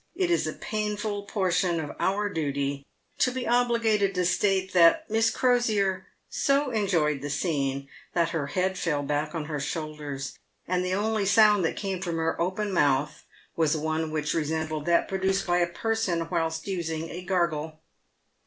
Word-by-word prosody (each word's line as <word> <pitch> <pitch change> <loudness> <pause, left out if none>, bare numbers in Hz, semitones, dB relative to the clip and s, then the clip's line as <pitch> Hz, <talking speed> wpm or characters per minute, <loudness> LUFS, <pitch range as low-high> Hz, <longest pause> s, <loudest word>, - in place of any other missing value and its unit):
It 360 -1 0
is 345 - +2
a - - -3
painful 210 -1 -3
portion 180 -4 +1
of 150 -2 -5
our 205 +2 +1
duty 140 -5 -2 0.3
to 260 - +4
be 255 0 -4
obliged 230 -4 +2
to 180 0 +1
state 190 +1 +1
that 180 - +5
Miss 225 +1 +3
Crosier 220 -7 +1 0.2
so 275 -1 +1
enjoyed 170 - +1
the 145 - -4
scene, 140 -3 -1 0.3
that 170 -1 +2
her 160 -4 -2
head 185 +4 -1
fell 150 -5 0
back 150 +2 -2
on 160 -2 -3
her 150 -1 -3
shoulders, 145 -2 -5 0.3
and 180 0 0
the 185 0 0
only 210 0 0
sound 210 -1 +5
that - - -1
came 190 -3 -3
from 170 -3 -2
her 165 +1 -1
open 190 +3 -1
mouth 145 -3 +1 0.3
was 160 -1 +2
one 160 +1 -1
which 155 -1 -1
resembled 155 -1 -2
that 170 0 +3
produced 190 0 0
by 175 0 +2
a 175 - +2
person 180 -3 -1
whilst 160 -2 -1
using 165 -4 -3
a 175 - -6
gargle. 160 -4 -1
175 Hz, 165 wpm, -27 LUFS, 155-205 Hz, 0.3 s, that